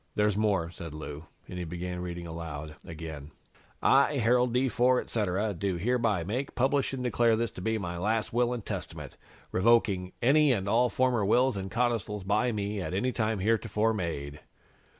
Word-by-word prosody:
"There's 105 -1 +2
more," 100 -6 +1
said 85 -4 -8
Lou, 75 0 -7 0.2
and 90 - -6
he - - -3
began 90 +2 -5
reading 85 -1 -5
aloud 80 -2 -6
again: 80 -3 -8 0.5
"'I, 140 +2 +5
Harold 125 +1 +3
D. 125 +2 +2
Ford, 125 +1 +2
etc., 105 -1 -1
do 95 +1 -2
hereby 110 -2 +1
make, 125 +10 -3
publish 135 +2 +1
and 130 -2 -4
declare 120 -2 +3
this 115 -1 -1
to - - -9
be 110 +3 0
my 85 -4 -4
last 110 +4 0
Will 120 0 +2
and 120 -4 -4
Testament, - - -6 0.4
revoking 95 -3 +2
any 145 +3 +4
and 100 -4 -2
all 120 +4 +3
former 125 -4 +1
wills 125 +5 +3
and 95 0 -4
codicils 115 -4 -1
by 105 +6 +1
me 105 -1 -2
at 90 - -3
any 125 +7 +1
time 110 -4 -1
heretofore 110 +1 +1
made.'" 75 -7 -4
105 Hz, 175 wpm, -29 LUFS, 90-120 Hz, 0.5 s, I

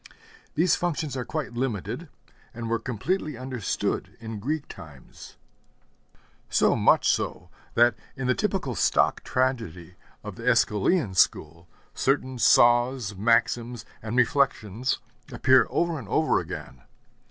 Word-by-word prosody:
These 170 +2 +3
functions 155 -5 -2
are 125 - -2
quite 150 -1 -4
limited, 120 - -3 0.5
and 115 -1 -5
were 115 - +1
completely 140 - -3
understood 130 -4 -3
in 110 -2 -7
Greek 145 +7 -3
times; 75 -8 -13 1.1
so - - +3
much - - +3
so, - - -1 0.2
that 120 0 +5 0.2
in 135 -1 -4
the 125 - +3
typical 190 - -1
stock - - +2
tragedy 115 -10 -2 0.3
of 105 -3 -8
the 115 - -9
Æschylean 115 - +2
school 85 -1 +1 0.3
certain 130 -2 0
saws, 120 -2 +4
maxims, 115 +2 +1 0.2
and 110 +2 -4
reflections 125 -3 +1 0.3
appear 130 -3 +4
over 170 -2 0
and 115 - -10
over - - +2
again. 65 -2 -8
120 Hz, 120 wpm, -26 LUFS, 110-135 Hz, 1.1 s, that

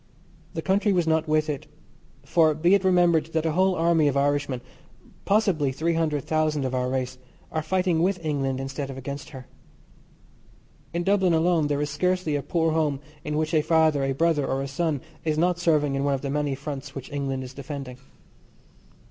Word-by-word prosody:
The - - -3
country 200 +2 +2
was 175 -2 +2
not 160 0 +1
with 155 0 +2
it, 145 -3 -4 0.6
for 160 -2 +3
be 170 +5 +3
it 200 -1 +4
remembered 175 -4 +3
that 160 0 0
a 160 - +2
whole 185 +3 +2
army 165 -2 +3
of 140 -1 +1
Irishmen, 140 -2 0 0.6
possibly 195 -9 +2
three 160 +6 -1
hundred 155 -4 0
thousand 155 -3 0
of 130 - -2
our 125 0 0
race, 130 -1 -3 0.3
are 155 - -1
fighting 180 0 +1
with 185 +2 +2
England 135 -3 -1
instead 135 +1 -4
of 135 - -7
against 140 +1 -6
her. 130 -3 -10 1.5
In 170 +1 -2
Dublin 190 -2 +3
alone 165 -2 +2
there 145 0 0
is 145 - -3
scarcely 180 0 0
a 145 - 0
poor 165 +2 0
home 155 -3 0 0.2
in 150 0 -2
which 155 +1 -1
a 155 - +4
father, 160 -2 +3
a 135 0 0
brother, 160 0 +2
or 135 +1 -1
a - - -4
son 145 0 -1 0.2
is 155 -1 0
not 175 +2 +2
serving 150 -5 +2
in 135 0 -1
one 140 -1 +2
of 135 - -5
the 140 - -3
many 145 -1 0
fronts 140 0 -7
which 135 +1 -7
England 135 -2 -2
is 130 0 -9
defending. 135 -2 -7
155 Hz, 195 wpm, -25 LUFS, 140-165 Hz, 1.5 s, it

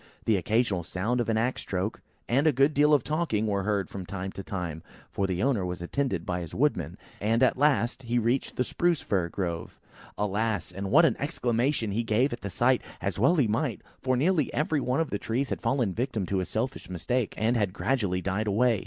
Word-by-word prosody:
The 110 - +3
occasional 105 0 +1
sound 95 +8 -1
of 115 - -2
an 110 - +2
axe 120 +3 0
stroke, 95 +3 -3 0.3
and 135 +6 +3
a - - +6
good 140 +3 +3
deal 150 +1 +4
of 145 -5 +4
talking, 150 -9 0
were 100 -2 0
heard 100 -1 0
from 95 - -6
time 95 +1 -5
to 95 - -7
time, 90 -5 -4 0.3
for 100 - 0
the 95 +1 -1
owner 125 -8 +2
was 90 0 -3
attended 95 - -2
by 90 0 -1
his 85 -3 -7
woodman: 125 - 0 0.2
and 115 +4 +2
at 130 - +4
last 135 -3 +2
he 120 -1 -1
reached 120 +3 0
the 125 - +1
Spruce 170 +3 +1
fir 90 -4 0
grove. 85 -4 -4 0.4
Alas! 105 -2 -1
and 95 +2 -4
what 155 - +6
an 130 - +3
exclamation 125 -4 0
he 110 +4 0
gave 120 +4 +1
at 120 - -6
the 100 - -4
sight, 120 +7 +2 0.2
as 100 0 -3
well 135 - +4
he 140 -8 +3
might; 115 +3 -1 0.2
for 130 -1 +1
nearly 160 +2 +2
every 150 0 +1
one 125 +3 0
of 160 - -2
the 100 - -1
trees 125 +4 -2
had - - -2
fallen 130 -6 +1
a - - -6
victim 115 -4 -2
to 95 +1 -1
his 90 - -3
selfish 115 -4 -3
mistake, 110 +7 -1
and 115 +3 +2
had 105 -5 +1
gradually 100 -5 0
died 100 +3 -1
away. 110 +2 +3
115 Hz, 225 wpm, -28 LUFS, 95-130 Hz, 0.4 s, a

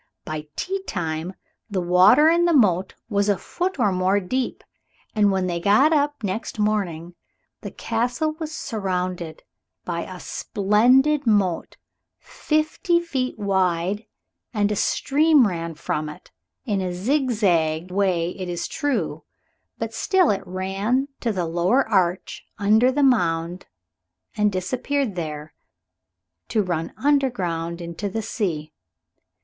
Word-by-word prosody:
By 155 -1 -5
tea 385 +1 -3
time 165 0 -3 0.3
the 200 -3 -1
water 185 - +6
in 340 +1 +4
the 340 -2 +3
moat 190 -8 +3
was 205 -2 +1
a 200 - +3
foot 360 - -3
or 210 -6 +2
more 185 +2 +2
deep, 250 +7 -3 0.5
and 205 -2 +3
when 190 -1 0
they 175 -1 -2
got 215 - +4
up 290 -4 0
next 205 +3 -3
morning 190 -6 -1 0.5
the - - -6
Castle 245 +7 -1
was 315 -1 -4
surrounded 180 - -3 0.4
by 170 -1 -2
a 185 +1 -8
splendid 250 +12 +2
moat 195 -6 +1 0.4
fifty 310 +3 0
feet 265 -8 -3
wide, 190 0 0 0.5
and 205 -1 +2
a - - 0
stream 290 +4 +3
ran 165 -3 -4
from 150 -1 -3
it, 150 - -12 0.3
in 205 -6 0
a 180 -1 -2
zigzag 185 - +1
way 180 -3 +1
it 185 -1 -6
is 175 -1 -3
true, 245 - -2 0.5
but - - -4
still 380 - +3
it 195 -1 -1
ran, 195 +9 -1
to 235 - -1
the 185 -4 -1
lower 175 +11 +2
arch 185 -4 0
under 220 +5 +4
the 285 +2 +1
mound, 175 -8 +1 0.7
and 210 -1 +2
disappeared 245 +6 -1
there, 155 -3 -5 0.9
to 215 - +1
run 170 -3 -2
underground 185 - 0
into 170 +4 -4
the 220 +3 -3
sea. 160 -9 -3
200 Hz, 130 wpm, -23 LUFS, 175-255 Hz, 0.9 s, water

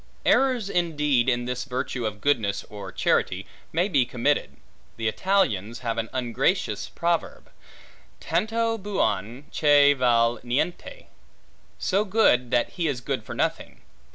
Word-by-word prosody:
Errors 255 -6 +3
indeed 150 -9 +1
in 120 -1 0
this 125 0 -3
virtue 125 -2 -3
of 105 -1 -7
goodness, 105 -7 +1
or 100 -3 -8
charity, 95 +2 0 0.3
may 175 +4 +1
be 145 -10 +3
committed. 125 +4 -1 0.4
The 115 -1 -1
Italians 115 - 0
have 115 -2 -2
an 115 -1 -3
ungracious 130 - -1
proverb, 170 -1 -2 0.7
Tanto 225 +1 0
buon 125 - -2
che 145 -1 +5
val 120 -3 +2
niente: 160 - -3 0.7
so 200 +2 +1
good, 185 - +3
that 120 - +1
he 170 -3 -2
is 140 -5 -1
good - - -3
for - - -8
nothing. - - -3
130 Hz, 130 wpm, -25 LUFS, 115-175 Hz, 0.7 s, che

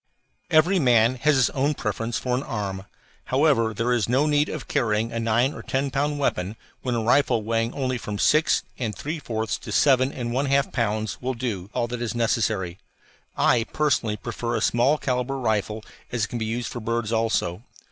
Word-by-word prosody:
Every 175 +4 +4
man 120 -4 +4
has 150 +3 +3
his 130 -3 +4
own 140 +2 0
preference 115 +1 -2
for 125 -1 -1
an 125 - -1
arm. 100 -6 -4 0.4
However, 130 -5 +3
there 115 +3 0
is 115 -2 0
no 130 +4 +3
need 150 0 +2
of 145 -6 -6
carrying 110 0 0
a 115 - -2
nine 115 +5 +2
or - - -8
ten 135 +1 -1
pound 145 +2 0
weapon 100 -7 -1 0.3
when 125 -2 -1
a 115 - -1
rifle 120 -1 +3
weighing 115 +1 0
only 130 -2 -1
from 105 -2 -5
six 155 +9 +3 0.2
and 115 -5 -2
three 155 +3 -4
fourths 110 -5 -3
to - - -8
seven 130 -2 +4
and 120 -3 -4
one 135 +3 0
half 140 +1 +2
pounds 110 -3 -1
will 130 +1 -2
do 105 -6 -4
all 120 -2 +1
that 120 0 -5
is 120 0 -2
necessary. 110 -6 0 0.6
I, 115 -2 +3
personally, 125 -9 0
prefer 120 +3 -3
the 110 - -1
small 125 +7 +3
calibre 130 0 -1
rifle, 110 -3 -1 0.3
as 120 -3 -1
it - - -12
can 120 - -4
be 110 - -2
used 115 +2 -3
for 120 - -5
birds 115 -1 -2
also. 110 -5 0
120 Hz, 200 wpm, -24 LUFS, 110-135 Hz, 0.6 s, Every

